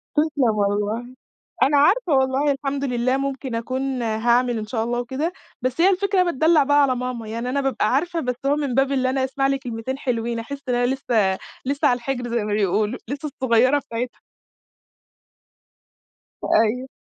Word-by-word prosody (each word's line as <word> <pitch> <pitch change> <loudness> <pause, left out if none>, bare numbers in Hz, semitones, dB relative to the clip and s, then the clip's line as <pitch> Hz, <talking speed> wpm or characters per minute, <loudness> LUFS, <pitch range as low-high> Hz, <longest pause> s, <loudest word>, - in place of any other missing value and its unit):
تسلم 290 -7 +2
والله. 210 +5 -1 0.5
أنا 285 +2 +4
عارفه 360 +5 +3
والله، 265 +2 +2
الحمد 275 0 -3
لله 255 0 0
ممكن 270 -2 -3
أكون 260 +2 -2
هاعمل 235 +2 +1
إن 215 - -4
شاء 220 0 -1
الله 240 +1 -1
وكده، 265 +8 -2 0.3
بس 255 +5 -1
هي 375 - +6
الفكرة 390 0 +2
إن 360 - +1
أنا - - +2
باتدلّع 315 +1 +4
بقى 290 +1 +4
على 260 -2 +2
ماما، 250 -2 -4
يعني 230 +3 -4
أنا 280 +2 0
بابقى 255 -4 0
عارفه، 335 +5 0
بس 250 -5 -2
هو 280 +1 +3
من 285 -5 -2
باب 270 +1 +2
اللي 260 -2 +1
أنا 265 0 0
أسمع 270 +1 0
لي 275 0 +1
كلمتين 245 0 -5
حلوين، 235 -3 -2
أحِس 280 +5 -6
إن 245 - +2
أنا 245 0 +2
لسّه 220 -8 +1 0.3
لسّه 280 +2 +1
على 245 - +3
الحِجر 245 0 -4
زي 235 -2 0
ما 210 - -2
بيقولوا، 210 +3 0
لسّه 285 +3 -4
الصغيّرة 260 +1 +3
بتاعتها. 240 -1 -5 2.3
أيوه. 230 +4 +2
255 Hz, 180 wpm, -22 LUFS, 235-280 Hz, 2.3 s, هي